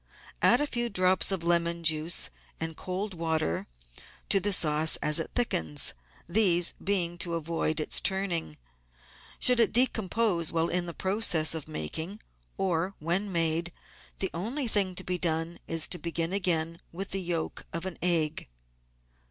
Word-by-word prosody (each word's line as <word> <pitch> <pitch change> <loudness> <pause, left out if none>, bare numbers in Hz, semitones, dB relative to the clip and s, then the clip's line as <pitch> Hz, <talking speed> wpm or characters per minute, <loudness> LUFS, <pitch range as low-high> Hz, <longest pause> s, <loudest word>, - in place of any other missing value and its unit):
Add - - +5
a 295 - +2
few 240 -4 -1
drops 185 -1 +2
of 190 -3 -1
lemon 170 0 +2
juice 160 +1 0 0.3
and 160 0 -4
cold 190 +4 -4
water 160 - -1 0.6
to 195 - +5
the 205 +2 0
sauce 155 -3 +3
as 150 +1 0
it 165 - -2
thickens, 80 - +2 0.3
these 175 -2 +5
being 175 -3 -1
to 170 -1 -1
avoid 165 -1 -1
its 155 - +1
turning. 185 - -2 0.8
Should 250 -1 +3
it 230 - +4
decompose 220 -7 +2
while 165 0 +1
in 175 0 -1
the 170 - -6
process 190 -6 +1
of 160 -3 -5
making 160 - -5 0.4
or 185 0 -1
when 180 +6 -1
made, 165 0 +1 0.5
the 190 - -2
only 240 - -3
thing 195 -4 +1
to 185 - -5
be 180 -1 -2
done 165 0 -1
is 165 -1 +4
to 180 - -3
begin 170 +1 -2
it - - +2
again 170 -3 0
with 190 +3 -4
the 195 - 0
yolk 170 -2 -3
of 170 +2 -4
an 190 -3 -5
egg. 160 - +1
175 Hz, 160 wpm, -29 LUFS, 165-195 Hz, 0.8 s, Add